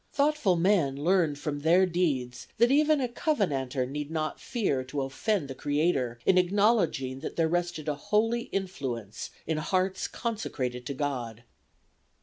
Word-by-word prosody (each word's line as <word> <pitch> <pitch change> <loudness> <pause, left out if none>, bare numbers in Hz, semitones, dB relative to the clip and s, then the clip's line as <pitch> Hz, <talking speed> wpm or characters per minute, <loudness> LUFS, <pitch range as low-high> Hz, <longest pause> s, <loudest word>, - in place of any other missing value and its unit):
Thoughtful 285 -10 +2
men 170 -6 +2
learned 165 -1 +2
from 145 0 -3
their 170 +5 +4
deeds 140 -9 -1
that 235 +3 +4
even 300 +1 +4
a 255 - 0
Covenanter 150 - 0
need 145 +3 -5
not 155 -1 -2
fear 195 - -1
to 140 +1 -3
offend 150 +5 -1
the 135 - -5
Creator 145 -4 0
in 185 - +5
acknowledging 180 - +2
that 150 - -6
there 165 -1 +2
rested 175 -2 -2
a 150 - +1
holy 220 +9 0
influence 130 - -4 0.2
in 160 -1 -1
hearts 185 +3 0
consecrated 130 - -3
to 140 - -4
God." 125 -5 -3
160 Hz, 145 wpm, -28 LUFS, 135-200 Hz, 0.2 s, in